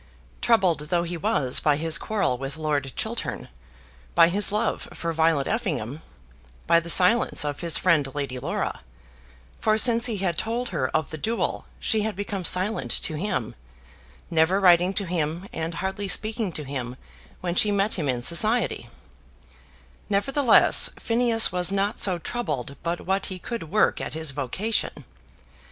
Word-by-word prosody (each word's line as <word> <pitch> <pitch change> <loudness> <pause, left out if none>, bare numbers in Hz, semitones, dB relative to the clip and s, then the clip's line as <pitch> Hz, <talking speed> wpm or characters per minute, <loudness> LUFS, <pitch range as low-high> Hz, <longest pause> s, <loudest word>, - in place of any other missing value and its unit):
Troubled 190 -9 +3
though 175 -1 +1
he 175 +1 -4
was 165 - 0
by 150 -2 +2
his 165 +3 +1
quarrel 205 -11 0
with 135 +4 -6
Lord 145 -4 -1
Chiltern, - - -4 0.7
by 165 - +6
his 200 +3 +1
love 210 +2 -1
for 165 0 -3
Violet 160 -3 +2
Effingham, 155 - -3 0.6
by 170 +1 +5
the 170 0 -7
silence 185 0 +4
of 145 -1 -3
his 170 -3 +1
friend 155 -6 +2
Lady 140 -3 -3
Laura, - - -3 0.8
for 215 0 +2
since 235 +1 +4
he 225 -3 -2
had 180 -4 -1
told 235 +2 -2
her 145 -8 -1
of 155 -2 -1
the 155 - -6
duel 225 +8 -2
she 220 -2 +1
had 215 -1 -2
become 200 -1 -4
silent 185 +5 -1
to - - -3
him, 155 - -2 0.8
never 165 +4 +3
writing 180 -1 +5
to 200 - 0
him, 170 +1 -3
and 165 0 -3
hardly 190 +3 -3
speaking 215 +1 0
to 155 - -4
him 130 -3 -5 0.5
when 175 -1 -2
she 205 +4 +4
met 200 +1 +1
him 150 -6 -1
in 120 -2 -1
society, 215 - +2 1.2
nevertheless 255 +6 +4
Phineas 230 -1 +2
was 180 0 0
not 200 +2 -1
so 185 -3 +2
troubled 150 - -4
but 170 +1 -3
what 190 +1 0
he 185 - -5
could 200 -3 -6
work 215 +5 +2
at - - -5
his 160 -2 -2
vocation. 150 - -2
180 Hz, 160 wpm, -25 LUFS, 155-210 Hz, 1.2 s, by